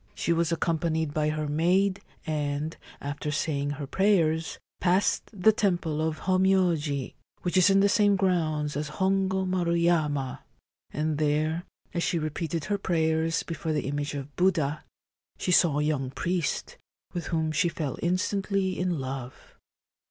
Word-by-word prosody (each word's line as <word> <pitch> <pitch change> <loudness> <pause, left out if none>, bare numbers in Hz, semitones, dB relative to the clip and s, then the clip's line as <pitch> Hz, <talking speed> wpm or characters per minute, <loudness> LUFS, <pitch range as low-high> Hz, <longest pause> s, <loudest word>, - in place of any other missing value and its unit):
She 170 - +1
was 170 0 +1
accompanied 160 -2 0
by 150 0 +1
her 155 0 -2
maid, 185 +6 +2 0.2
and, 150 0 -2 0.2
after 145 +1 -4
saying 145 -2 -1
her 145 - -4
prayers, 165 -2 +2 0.2
passed 185 +2 +1
the 210 0 +4
Temple 175 -8 0
of 160 -1 -2
Hommyoji, 180 -7 +1 0.3
which 175 - -1
is 185 +2 +6
in 195 0 +5
the 200 - +5
same 205 0 +4
grounds 160 -6 0
at 150 +1 -2
Kongo 190 +3 +1
Maru 180 -2 0
Yama, 150 -6 +1 0.5
and 155 0 -1
there, 155 +3 0 0.3
as 170 - -1
she 170 - 0
repeated 155 0 -3
her 205 -1 -1
prayers 160 -2 +1
before 160 -1 -3
the 150 - -1
image 145 +1 -2
of 140 0 -7
Buddha, 165 -6 +1 0.5
she - - -1
saw 170 -4 +4
a 150 - +1
young 145 -4 0
priest, 170 +3 -2 0.4
with 175 - -4
whom 160 -2 0
she 170 +3 +2
fell 150 -5 -4
instantly 190 +1 0
in 180 -2 0
love. 130 -2 -6
160 Hz, 150 wpm, -27 LUFS, 150-185 Hz, 0.5 s, is